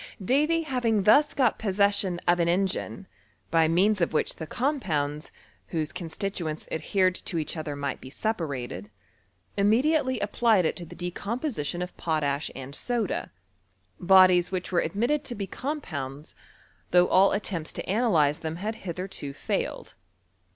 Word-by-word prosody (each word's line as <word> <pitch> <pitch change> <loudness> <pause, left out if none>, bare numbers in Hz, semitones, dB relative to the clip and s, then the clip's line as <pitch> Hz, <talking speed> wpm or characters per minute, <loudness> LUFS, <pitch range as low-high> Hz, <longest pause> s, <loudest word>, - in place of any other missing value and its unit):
Davy 305 - +2
having 240 -8 0
thus 285 +9 +5
got 250 -5 +2
possession 200 -3 +2
of 175 0 +4
an 170 - +2
engine, 190 +2 -1 0.5
by 165 -1 +4
meansof 180 +2 +2
which 155 - 0
the 160 - -6
compounds, 155 - -1 0.4
whose 155 -2 -2
constituenU 170 -2 -4
adhered 185 +4 +1
to 180 - -4
each 155 0 -2
other 155 -2 -4
might 140 -2 -4
be 130 - -9
separated, 135 - -3 0.7
imme 215 +5 +4
diately 300 -5 +1
applied 205 -2 +2
it - - 0
to 175 - -6
the - - -11
decomposition 180 - -3
of 180 - -8
potash 150 -2 -1
and 135 +1 -8
aoda; 235 +4 -2 0.7
bodies 185 -1 +6
which 185 -1 -3
were 175 - +3
admitted 240 +12 0
to 240 - -5
be 200 - -3
compounds, 155 - -5 0.6
though 180 0 +5
all 190 +2 +5
attempts 185 -6 -2
to - - -6
analyze 175 -9 +2
them 160 0 -4
had 210 +6 -3
hitherto 180 -5 -4
failed. 145 - -3
185 Hz, 145 wpm, -27 LUFS, 160-220 Hz, 0.7 s, bodies